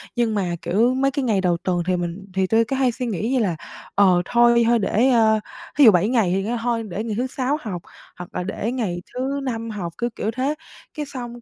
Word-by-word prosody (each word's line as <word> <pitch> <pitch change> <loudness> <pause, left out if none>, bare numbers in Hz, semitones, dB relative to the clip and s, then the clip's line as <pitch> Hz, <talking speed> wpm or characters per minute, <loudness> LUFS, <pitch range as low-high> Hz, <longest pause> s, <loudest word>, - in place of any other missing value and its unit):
Nhưng 230 -3 +1
mà, 180 -4 -1
kiểu, 215 +9 +2
mấy 275 +1 +1
cái 275 0 -2
ngày 210 -5 +2
đầu 175 -2 +1
tuần 175 -1 -1
thì 185 - +2
mình 175 +3 -4
thì 190 -1 +1
tui 225 +2 +3
cứ 270 - -2
hay 265 -2 +2
suy 250 +1 -4
nghĩ 220 +1 -2
như 260 - +2
là, 185 -7 0 0.4
ờ, 185 -3 +5
thôi 235 +1 +4
thôi 235 -1 +4
để, 225 +5 +2
à, 220 -3 +4 0.4
thí 290 - +6
dụ 220 - +10
7 185 +3 +2
ngày 225 -8 +2
thì 195 - 0
kêu 235 +4 -2
thôi 235 -2 0
để 205 +4 -3
ngày 220 -3 -3
thứ 255 - 0
Sáu 265 +2 -1
học, 185 -7 -5 0.4
hoặc 180 0 -8
là - - -1
để 205 +4 -3
ngày 200 -9 -2
thứ 265 +3 -2
Năm 230 -3 -3
học. 180 -6 -5
Cứ 240 - -1
kiểu 220 - -2
thế. 265 +5 -1 0.4
Cái 300 - -4
xong 240 -4 -8
225 Hz, 245 wpm, -22 LUFS, 190-250 Hz, 0.4 s, dụ